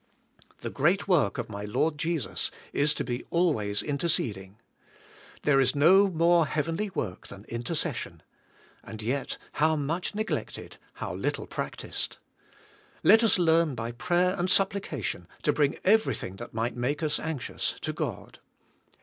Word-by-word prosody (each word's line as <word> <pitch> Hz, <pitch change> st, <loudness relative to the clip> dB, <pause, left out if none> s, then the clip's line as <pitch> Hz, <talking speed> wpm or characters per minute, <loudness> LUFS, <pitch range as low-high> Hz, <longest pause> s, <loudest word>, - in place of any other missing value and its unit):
The -, -, -4 dB
great 175 Hz, +9 st, +2 dB
work 175 Hz, -7 st, +3 dB
of 120 Hz, -2 st, -3 dB
my 100 Hz, -1 st, -6 dB
Lord 145 Hz, +9 st, 0 dB
Jesus 165 Hz, -4 st, -1 dB, 0.2 s
is 150 Hz, +1 st, +3 dB
to -, -, -1 dB
be 120 Hz, 0 st, -3 dB
always 125 Hz, -, +1 dB
interceding. 115 Hz, -, -1 dB, 0.9 s
There 140 Hz, -2 st, +4 dB
is 130 Hz, 0 st, +3 dB
no 190 Hz, +7 st, +6 dB
more 170 Hz, -1 st, +4 dB
heavenly 165 Hz, +8 st, -1 dB
work 100 Hz, -, -4 dB
than 100 Hz, +2 st, -11 dB
intercession. 120 Hz, +7 st, -4 dB, 0.6 s
And 110 Hz, -, -9 dB
yet, 130 Hz, +5 st, -2 dB
how 155 Hz, +1 st, +2 dB
much 160 Hz, +7 st, -2 dB
neglected, 215 Hz, +1 st, -4 dB, 0.2 s
how -, -, -5 dB
little -, -, -2 dB
practiced. -, -, -4 dB, 0.9 s
Let 225 Hz, +1 st, +7 dB
us 225 Hz, -, +5 dB
learn 165 Hz, -4 st, +3 dB
by 115 Hz, 0 st, -4 dB
prayer 175 Hz, +9 st, +1 dB
and 180 Hz, +1 st, 0 dB
supplication 180 Hz, -, 0 dB, 0.2 s
to 150 Hz, -, +3 dB
bring 145 Hz, -1 st, +1 dB
everything 195 Hz, -, +2 dB
that 120 Hz, -, -8 dB
might 115 Hz, +2 st, -2 dB
make 135 Hz, +6 st, -1 dB
us 150 Hz, -1 st, +2 dB
anxious 160 Hz, -6 st, -3 dB
to -, -, -2 dB
God. -, -, -5 dB
150 Hz, 140 wpm, -28 LUFS, 120-175 Hz, 0.9 s, Let